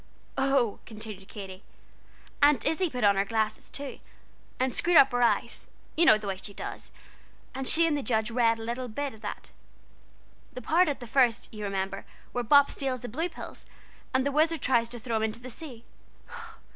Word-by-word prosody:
"Oh!" 270 -5 +1
continued 215 -3 -9
Katy, 190 -3 -9 0.8
"Aunt 285 -5 +5
Izzie 350 +2 +1
put 250 -5 -4
on 200 -1 +5
her 195 - +3
glasses 220 +1 -2
too, 280 -1 -6 0.6
and 260 -1 +1
screwed 345 -1 +3
up 270 - +7
her 245 0 0
eyes 240 - +1 0.3
you 335 - +4
know 215 - +7
the 215 - -9
way 195 -1 -2
she 200 +1 -10
does, - - -7 0.6
and 265 0 -4
she 335 +1 +5
and 320 -2 +2
the 285 - -1
judge 220 -1 0
read 230 -1 +3
a 225 - -7
little 240 +2 -3
bit 275 +4 -4
of 220 0 -16
it; 205 - -6 1.0
that 255 - -7
part 335 +6 +3
at 280 - -3
the - - -6
first, 240 -1 +2
you 210 -1 -6
remember, 195 0 -3 0.3
where 245 - -2
Bop 285 +4 +6
steals 260 -3 -2
the 245 - -5
blue 320 +10 -2
pills, - - -10 0.4
and 260 0 +1
the 280 - +1
Wizard 315 +1 +2
tries 235 -3 +2
to 240 - -5
throw 230 -1 -2
him - - -1
into 220 +1 -2
the 250 +1 -7
sea. 240 -3 -9
245 Hz, 195 wpm, -28 LUFS, 220-275 Hz, 1.0 s, up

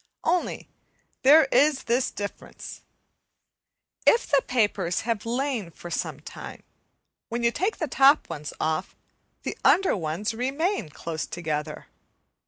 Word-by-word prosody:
Only 360 - 0 0.5
there 295 +3 +7
is 290 -2 +4
this 245 +2 +1
difference, 205 0 -7 1.3
if 470 - +5
the 280 -2 +3
papers 205 -7 +1
have 230 -1 -2
lain 245 -5 -1
for 175 +1 -11
some - - -3
time, - - -9 0.7
when 235 +1 -3
you 235 - +4
take 390 - -1
the 320 - -2
top 275 +3 +5
ones 150 0 -6
off, 155 +3 -1 0.5
the - - -3
under 385 0 +4
ones 175 +5 -2
remain 270 - -1
close 160 +1 -5
together. 155 -3 -4
235 Hz, 125 wpm, -26 LUFS, 175-280 Hz, 1.3 s, there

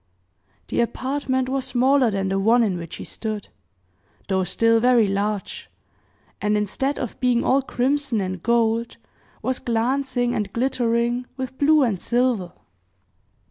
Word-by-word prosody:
The - - +1
apartment 260 +1 -1
was 265 0 -1
smaller 260 0 +3
than 195 -2 -1
the 195 0 0
one 230 +4 +4
in 200 -5 0
which 170 -1 -7
he - - -8
stood 215 -3 -5 0.8
though 190 -1 +1
still 230 +5 +2
very 245 -1 +4
large, 200 0 -3 0.7
and 210 0 +1
instead 265 +7 -1
of 245 - -5
being 250 -2 +2
all 270 +2 +3
crimson 270 -1 0
and 185 -2 -3
gold, 230 +1 +1 0.5
was 260 0 -1
glancing 245 +1 0
and 205 -2 -2
glittering 240 0 0
with 260 -1 -5
blue 300 0 +5
and 210 -8 -1
silver. 240 -7 0
235 Hz, 140 wpm, -23 LUFS, 210-260 Hz, 0.8 s, blue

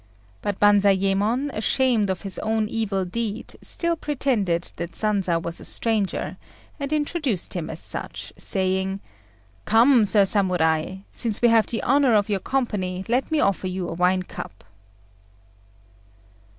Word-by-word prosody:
But 200 -1 -3
Banzayémon, 205 +5 +3
ashamed 225 -1 +2
of 190 - -3
his 195 -2 -5
own 220 0 0
evil 205 -4 -1
deed, 220 +4 -4
still 340 -1 0
pretended 240 - -1
that 170 0 -5
Sanza 200 -5 +1
was 170 0 -6
a - - -11
stranger, 220 -4 -2 0.4
and 280 0 -4
introduced 295 - -1
him 170 -4 -4
as 160 - -6
such, - - -5
saying 190 0 -1 0.7
"Come 235 +1 +5
Sir 205 -1 +4
Samurai, 185 -3 +1
since 220 -3 +1
we 240 - +4
have 225 -1 +4
the 230 - -3
honour 270 -3 +3
of 205 0 +2
your 200 -2 0
company, 190 -7 -2
let 245 +3 0
me 315 -1 +1
offer 195 -4 +1
you 185 -1 -3
a - - -4
wine 180 +2 +2
cup." 95 - -9
205 Hz, 140 wpm, -23 LUFS, 185-235 Hz, 0.7 s, Come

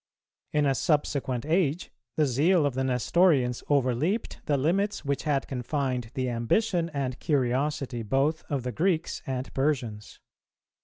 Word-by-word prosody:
In 150 -1 +2
a 135 - +3
subsequent 135 -2 0
age, 165 0 0 0.2
the 155 - +3
zeal 150 +6 +3
of 140 - 0
the 130 +1 -1
Nestorians 130 0 +2
overleaped 145 - 0
the 145 -2 +2
limits 185 +7 0
which 140 +2 -1
had 140 -3 0
confined 130 -2 -2
the 130 -1 -1
ambition 165 - +1
and 135 -3 -3
curiosity 135 -2 0
both 135 +8 0
of 140 -4 -1
the 125 - -2
Greeks 165 - 0
and 130 0 -4
Persians. 125 -7 -2
140 Hz, 140 wpm, -27 LUFS, 125-155 Hz, 0.2 s, a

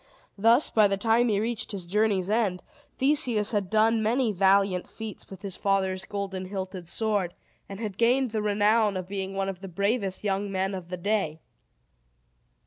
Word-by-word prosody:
Thus, 230 +7 +4
by 215 -2 +5
the 195 0 -1
time 230 +3 +3
he 205 -2 +2
reached 230 +1 -2
his 190 -3 -5
journey's 200 0 +1
end, 205 -4 0 0.3
Theseus 250 -6 +2
had 205 -4 -1
done 220 +1 +3
many 230 +2 +1
valiant 195 -1 +2
feats 220 -2 -8
with 195 0 -11
his 195 -2 -4
father's 190 -1 0
golden 195 -2 -4
hilted 185 -2 -6
sword, 200 -2 -1 0.3
and 195 0 -7
had 210 -3 -5
gained 250 +1 +3
the 215 -1 -1
renown 210 0 +2
of 185 -1 -5
being 195 0 -4
one 195 0 -1
of 195 -2 -4
the 195 - -7
bravest 200 +2 -1
young 200 0 -1
men 190 +1 -1
of 180 -2 -7
the 180 - -4
day. 185 -4 -1
200 Hz, 175 wpm, -27 LUFS, 190-220 Hz, 0.3 s, by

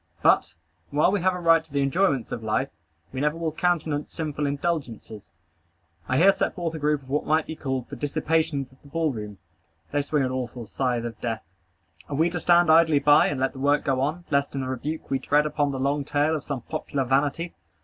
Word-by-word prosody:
But, - - +3 0.3
while 150 +5 +3
we 205 -2 0
have 185 +1 +2
a - - -4
right 165 -2 +4
to 160 - -27
the 140 0 +1
enjoyments 140 - +1
of 115 - -4
life, 110 +5 0 0.4
we 130 - -3
never 150 +2 +1
will 165 -1 -2
countenance 155 -3 -1
sinful 150 -2 -3
indulgences. 140 - -4 0.8
I 130 - +2
here 190 +6 +7
set - - -2
forth 170 -3 -3
a 160 - -5
group 150 -1 0
of 130 - -17
what 150 - 0
might 155 +1 +2
be 160 - -6
called 130 -4 -3
the 140 - -8
dissipations 150 0 -1
of 130 - -23
the - - -17
ball 160 +1 0
room. 105 -4 -7 0.5
They 145 - +1
swing 145 0 0
an 130 - -1
awful 125 -2 -4
scythe 120 +1 -1
of 115 -2 -7
death. 115 -2 -3 0.7
Are 145 - -3
we 165 +4 +2
to 175 - -2
stand 175 -1 +4
idly 160 -2 +5
by, 145 +3 +5
and 145 - -2
let 135 0 0
the 135 - -9
work 145 +2 +2
go 130 -1 +1
on, 155 +6 -2
lest 140 0 +1
in 135 - -1
the 130 - -4
rebuke 145 +5 -4
we 135 - +1
tread 145 +3 +2
upon 150 -1 0
the 135 - -4
long 140 +2 0
trail 150 +2 +1
of 155 - -4
some 140 -4 -4
popular 145 -3 -3
vanity? 145 +6 0
145 Hz, 225 wpm, -25 LUFS, 130-160 Hz, 0.8 s, here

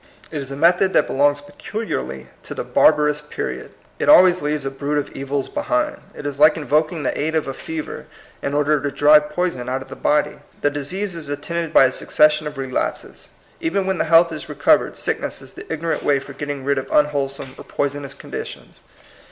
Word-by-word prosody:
It 150 - -3
is 135 - -6
a 140 - -5
method 175 +5 +3
that - - +4
belongs 145 +1 +2
peculiarly 145 - -5 0.2
to - - -8
the - - -3
barbarous 150 -1 +3
period. 150 - -5 0.3
It - - +1
always 185 -10 +7
leaves 150 -1 -2
a 135 - -2
brood 145 +2 -2
of 145 - -2
evils 135 0 -3
behind. 300 0 -1 0.2
It - - -9
is 145 -1 -4
like 155 +1 +7
invok 155 0 +1
ing 165 -4 -5
the - - -1
aid 160 +2 -1
of 155 - 0
a 135 - -3
fever 160 +2 -6 0.3
in 140 - -2
order 150 0 +2
to 145 - -1
drive 150 +1 +5
poison 150 -6 -2
out 130 +1 -2
of - - -20
the - - -8
body. 150 0 +1 0.2
The 145 - +2
disease 180 +8 -3
is 160 -4 -7
at 145 0 -4
tended 170 0 -3
by 135 - +7
a 130 - +2
succession 150 +2 +2
of 150 -1 -7
relapses. 130 -1 -4 0.3
Even 190 +4 -1
when 190 -1 -1
the - - +1
health 165 +1 +5
is 155 +1 -7
recovered, 150 - +2
sickness - - -2
is - - -13
the - - -10
ignorant 160 +1 -2
way 145 - +2
for 140 +1 -8
getting 145 -1 -5
rid 140 -1 +1
of 130 - -8
un 150 - +5
wholesome 135 -2 -4
or - - -8
poisonous 140 -1 -3
conditions. - - -8
150 Hz, 210 wpm, -21 LUFS, 140-160 Hz, 0.3 s, always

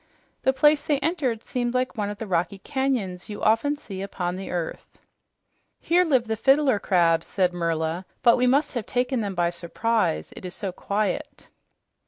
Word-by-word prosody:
The 265 - +3
place 295 +2 +4
they 290 -1 +1
entered 275 -7 -1
seemed 245 -1 -2
like 255 0 0
one 205 -3 -2
of 205 - -6
the 225 - -5
rocky 185 +1 -1
canyons 240 -8 -2
you 205 - -6
often 230 +7 +3
see 195 -9 -8
upon 180 -2 -3
the 190 +1 -6
earth. 175 -2 -5 0.8
"Here 350 +2 +3
live 265 -8 +2
the 220 -1 -1
fiddler 270 +1 +3
crabs," 170 -4 +2
said 180 -2 +1
Merla, 165 +1 -2 0.2
"but 235 - +7
we 250 0 +2
must 280 +4 +2
have 240 -5 -3
taken 250 0 0
them 200 -2 -3
by 170 -1 +1
surprise, 170 - -1
it - - -10
is 180 0 -6
so 195 -3 -4
quiet." 215 +10 -3
215 Hz, 180 wpm, -25 LUFS, 180-265 Hz, 0.8 s, but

